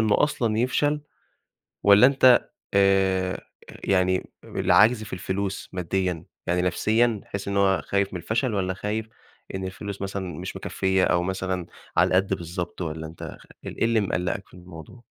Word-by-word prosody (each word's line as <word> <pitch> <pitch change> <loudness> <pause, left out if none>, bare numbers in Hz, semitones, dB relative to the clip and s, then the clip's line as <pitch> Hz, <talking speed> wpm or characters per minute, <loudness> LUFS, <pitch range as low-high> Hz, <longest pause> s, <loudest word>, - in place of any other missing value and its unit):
إنه 110 -2 +3
أصلًا 115 -7 +1
يفشل 145 +5 +1 0.8
والّا 100 +5 +8
أنت 130 -2 +5 0.2
آآ 95 -1 +2 0.4
يعني 95 -1 +1
العَجْز 110 +5 +3
في 100 - -9
الفلوس 95 +2 -3
مادّيًا؟ 90 -1 -2 0.2
يعني 90 +1 +1
نَفْسيًا 110 +5 +1
تحس 100 0 -6
إن 100 0 -1
هو 95 -4 +3
خايف 100 -1 0
من 90 - -3
الفشل 110 - -1
والّا 95 -2 0
خايف 105 +3 -3 0.5
إن 95 - -4
الفلوس 100 +1 -6
مثلًا 95 -4 -4
مش 90 - -6
مكفّية 95 -1 0
أو 85 0 +2
مثلًا 95 -1 -2 0.3
على - - +6
القَد 95 +1 +2
بالضبط، 85 0 -5
والّا 80 -1 -4
أنت 80 - -11 0.2
خ - - -18 0.2
إيه - - -3
ال - - -12
إيه - - +2
اللي 115 -1 +3
مِقلَّقك 90 0 -2
في - - -25
الموضوع؟ 90 +5 -12
95 Hz, 160 wpm, -25 LUFS, 90-105 Hz, 0.8 s, والّا